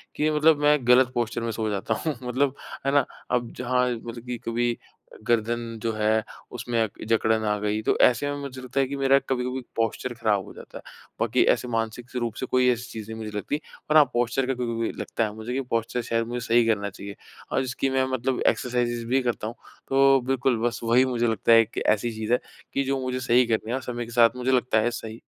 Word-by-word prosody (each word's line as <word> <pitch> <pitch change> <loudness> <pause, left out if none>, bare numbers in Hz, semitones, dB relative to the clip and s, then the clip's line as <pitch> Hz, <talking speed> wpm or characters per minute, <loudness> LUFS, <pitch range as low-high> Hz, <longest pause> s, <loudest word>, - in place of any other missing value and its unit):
कि 155 +1 +1
मतलब 150 0 +4
मैं 150 0 +5
ग़लत 125 0 +6
पॉस्चर 120 0 -1
में 115 0 -2
सो 110 0 -2
जाता 105 +2 -1
हूँ 155 - 0
मतलब 130 +2 0 0.3
है 135 - +2
ना 145 - +4 0.3
अब 120 -2 0
जहाँ 125 0 +1
मतलब 115 0 -6
कि 125 -1 -4
कभी 120 +1 +1 0.4
अ, - - -12
गर्दन 115 0 -1
जो 115 - 0
है 110 0 +1 0.3
उसमें 120 -1 -2
अ, - - 0 0.2
जकड़न 110 -1 +2
आ 105 0 +1
गई 105 +1 -1
तो - - +1
ऐसे 125 +3 +4
में 145 - -3
मुझे 130 -2 -7
लगता 130 +2 -3
है 135 - +3
कि 140 - -4
मेरा 135 0 +4
कभी-कभी 125 0 -1
पॉस्चर 115 +2 -1
ख़राब 105 -4 0
हो - - -11
जाता - - -11
है। - - -10 0.4
बाकी - - +3
ऐसे - - -4
मानसिक 115 +1 -3
से 125 - -3
रूप 115 -2 -2
से - - -2
कोई 125 0 +3
ऐसी 120 0 -4
चीज़ 110 -1 -7
नहीं 110 - -6
मुझे 105 - -6
लगतीं 145 +8 -2 0.3
और 155 - +5
हाँ 150 - +8
पॉस्चर 120 +2 +1
का 135 - +1
कभी-कभी 115 -2 -2
लगता - - -2
है 105 -2 -2
मुझे 110 +3 -5
कि 135 - 0
पॉस्चर 115 +2 -1
शायद 115 0 -1
मुझे 120 +1 -3
सही 120 0 +4
करना 100 -2 +1
चाहिए 100 +1 -9 0.4
और - - +1
इसकी 130 +1 -1
मैं 130 0 +1
मतलब 130 0 -1
एक्सरसाइजेज़ 120 -1 0
भी 130 +3 +2
करता 120 -3 -2
हूँ। 115 - -6 0.3
तो 135 0 +5
बिल्कुल 130 -2 +1
बस 120 - -3
वही 120 +3 +4
मुझे 120 -2 0
लगता 115 +1 +1
है 115 0 +7
कि - - -6
ऐसी 115 +3 -3
चीज़ 110 +2 -2
है 125 - +4 0.3
कि 140 - +1
जो 135 0 -1
मुझे 130 0 -2
सही 125 0 +3
करनी 110 -1 -1
है - - 0
और 130 - -3
समय 120 -1 -4
के 115 - -11
साथ 115 0 +4
मुझे 125 +1 -1
लगता 125 -3 +2
है 120 - +1
सही 115 0 -7
120 Hz, 235 wpm, -25 LUFS, 115-130 Hz, 0.4 s, हाँ